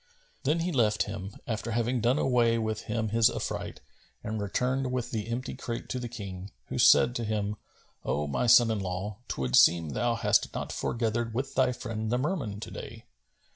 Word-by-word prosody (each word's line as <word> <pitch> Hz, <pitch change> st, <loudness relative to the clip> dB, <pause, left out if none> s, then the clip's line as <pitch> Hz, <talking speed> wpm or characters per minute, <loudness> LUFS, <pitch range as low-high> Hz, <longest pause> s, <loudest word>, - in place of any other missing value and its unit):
Then 165 Hz, +2 st, +2 dB
he 180 Hz, +2 st, -1 dB
left 110 Hz, -7 st, +2 dB
him, 95 Hz, +2 st, -6 dB
after 115 Hz, 0 st, -3 dB
having 120 Hz, +2 st, 0 dB
done 120 Hz, +4 st, +3 dB
away 120 Hz, -4 st, +3 dB
from 110 Hz, -1 st, 0 dB
him 110 Hz, 0 st, -3 dB
his 115 Hz, +1 st, +4 dB
affright, -, -, -4 dB, 0.4 s
and 110 Hz, 0 st, -3 dB
returned 125 Hz, +6 st, -1 dB
with 125 Hz, -2 st, -2 dB
the 110 Hz, -1 st, -3 dB
empty 120 Hz, +2 st, -3 dB
crate 115 Hz, -1 st, -5 dB
to 130 Hz, -, -2 dB
the 120 Hz, -1 st, -5 dB
King, 100 Hz, -5 st, -7 dB, 0.2 s
who -, -, -3 dB
said 120 Hz, -, +6 dB
to 120 Hz, -, -3 dB
him, 105 Hz, -1 st, -1 dB, 0.5 s
"O 75 Hz, +1 st, -1 dB
my 75 Hz, -, -1 dB
son 120 Hz, -1 st, +7 dB
in 110 Hz, -, -1 dB
law, 95 Hz, +3 st, -4 dB
'twould 65 Hz, -2 st, -1 dB
seem 85 Hz, -2 st, +5 dB
thou 60 Hz, -, 0 dB
hast -, -, +2 dB
not -, -, -3 dB
foregathered 115 Hz, 0 st, -1 dB
with 135 Hz, +2 st, -2 dB
thy 130 Hz, -1 st, +3 dB
friend 110 Hz, -3 st, -4 dB
the 125 Hz, -, +2 dB
Merman 130 Hz, -, -2 dB
to -, -, -7 dB
day." -, -, -9 dB
115 Hz, 190 wpm, -29 LUFS, 105-125 Hz, 0.5 s, son